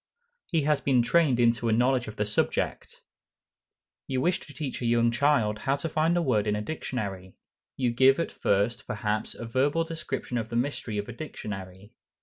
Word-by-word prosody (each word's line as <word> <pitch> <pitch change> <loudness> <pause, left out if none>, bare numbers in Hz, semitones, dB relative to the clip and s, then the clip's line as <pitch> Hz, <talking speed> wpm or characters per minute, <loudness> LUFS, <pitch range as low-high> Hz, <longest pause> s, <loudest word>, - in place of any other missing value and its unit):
He 165 -4 +1
has 150 -1 +2
been 130 -3 +3
trained 145 -2 +3
into 120 -1 +3
a - - +2
knowledge 125 +2 +2
of 110 - -7
the 105 - -1
subject. 105 - -2 1.0
You 130 -1 -1
wish 175 +6 +1
to - - -13
teach 135 -1 -5
a 120 - 0
young 115 0 +3
child 120 -5 +2
how 135 +4 +1
to 140 +3 -4
find 160 +2 +1
a 175 - +2
word 110 -7 +1
in 105 - +1
a 105 - -2
dictionary. 100 -9 -5 0.4
You 125 -3 +1
give 130 +4 +5
at 165 - -1
first, 105 +5 0
perhaps, 105 -2 -2
a 115 - -7
verbal 140 +7 +1
description 150 -6 -4
of 110 -1 -5
the 120 - -5
mystery 120 -3 -2
of 105 - -3
a 120 - -6
dictionary. 100 -7 -7
120 Hz, 190 wpm, -27 LUFS, 110-140 Hz, 1.0 s, give